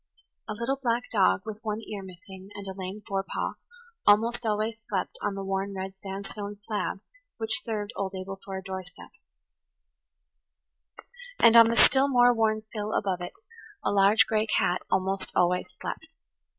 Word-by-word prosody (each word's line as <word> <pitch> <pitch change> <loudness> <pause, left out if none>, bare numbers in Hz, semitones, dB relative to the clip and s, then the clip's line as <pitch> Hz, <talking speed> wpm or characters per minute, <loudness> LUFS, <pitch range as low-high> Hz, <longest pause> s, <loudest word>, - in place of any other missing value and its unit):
A - - -1
little 235 +6 -1
black 240 -1 0
dog, 195 -2 +3
with 215 -1 -6
one 215 -1 -2
ear 210 -2 -6
missing 190 +1 -12
and 200 - -7
a 190 - -5
lame 190 +2 -6
forepaw, 195 -1 -2 0.5
almost 225 +4 +4
always 215 +1 -1
slept 195 -3 -2
on 200 - -1
the 195 - -4
worn 195 +1 -2
red 190 0 -4
sandstone 200 +1 -6
slab 210 -2 -2 0.4
which 220 -1 0
served 215 -2 -3
old 195 -1 -3
Abel 190 +1 -6
for 195 -1 -5
a 190 - -7
doorstep; 190 -2 -8 2.3
and 230 - +6
on 230 -1 +10
the 230 - +1
still 265 +3 +6
more 245 -2 +5
worn 220 -1 +1
sill 215 -1 -3
above 185 -3 0
it 175 - -5 0.5
a - - +1
large 200 +2 +5
gray 220 0 +1
cat 180 -4 +1
almost 190 +1 0
always 180 0 +2
slept. 320 0 -6
205 Hz, 160 wpm, -28 LUFS, 190-225 Hz, 2.3 s, on